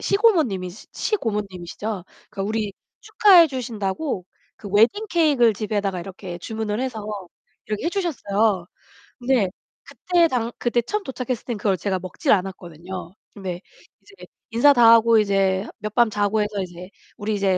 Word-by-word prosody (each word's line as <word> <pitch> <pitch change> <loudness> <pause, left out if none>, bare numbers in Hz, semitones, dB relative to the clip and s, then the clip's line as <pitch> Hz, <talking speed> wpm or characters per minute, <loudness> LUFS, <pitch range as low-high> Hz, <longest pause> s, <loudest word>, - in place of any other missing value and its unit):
시고모님이 320 - +2 0.2
시고모님이시죠? 205 - -3 0.3
그 - - -7
우리 215 0 -2 0.3
축하해 415 -6 +6
주신다고 230 - -3 0.3
그 205 - -9
웨딩 240 - +3
케이크을 285 -10 +4
집에다가 200 -3 -2
이렇게 185 0 -8
주문을 220 +3 -3
해서 245 -5 -4 0.6
이렇게 215 +5 -3
해 - - +1
주셨어요. 220 - 0 0.5
근데 245 -6 +2 0.3
그때 350 -2 +1
당 235 -3 -1
그때 240 0 +1
처음 415 - -3
도착했을 255 -2 -4
때 240 - -3
그걸 200 -2 0
제가 190 -1 -1
먹질 185 - -2
않았거든요. 180 -2 -5 0.2
근데 185 -3 -6 0.4
이제 400 0 -15 0.2
인사 245 +6 +6
다 235 -3 +7
하고 230 0 +5
이제 195 -1 +1
몇 215 0 -6
밤 240 -2 +5
자고 210 +1 +1
해서 210 -1 -2
이제 180 0 -10 0.3
"우리 215 +1 -2
이제 195 -2 +1
215 Hz, 330 characters per minute, -23 LUFS, 195-255 Hz, 0.6 s, 다